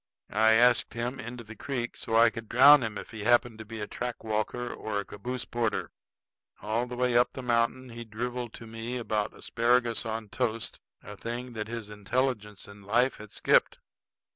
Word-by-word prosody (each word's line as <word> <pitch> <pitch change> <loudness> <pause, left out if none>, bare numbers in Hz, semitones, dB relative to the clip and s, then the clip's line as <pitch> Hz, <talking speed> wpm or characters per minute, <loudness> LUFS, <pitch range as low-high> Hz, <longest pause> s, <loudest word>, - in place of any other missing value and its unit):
I 110 +2 +5
asked 120 -1 +4
him 120 +3 -3
into 120 -1 -7
the 110 0 -11
creek, 120 +1 -3
so 115 - -3
I 115 0 +6
could 115 -1 -8
drown 140 +4 +8
him 110 -3 -3
if - - -8
he 110 -2 -6
happened 120 0 +3
to 110 - -7
be 110 +1 -7
a - - -2
track 120 +3 -5
walker 110 +3 -2
or 105 -2 -3
caboose 120 +6 -5
porter. 115 -3 -1 0.7
All 110 +4 -1
the 125 - -6
way 125 -1 +1
up 120 +1 +4
the 130 - -6
mountain 120 +1 +1
he 120 0 -7
driveled 120 +2 -4
to 115 - -9
me 115 +2 -5
about 110 -3 -2
asparagus 120 -1 +1
on 110 -2 -4
toast, 115 -2 -2 0.2
a - - -9
thing 120 +2 -5
that 110 -1 -4
his 115 -2 -5
intelligence 105 -1 -2
in 100 0 -13
life 120 +6 +2
had 105 -1 -11
skipped. - - +3
115 Hz, 190 wpm, -29 LUFS, 110-125 Hz, 0.7 s, drown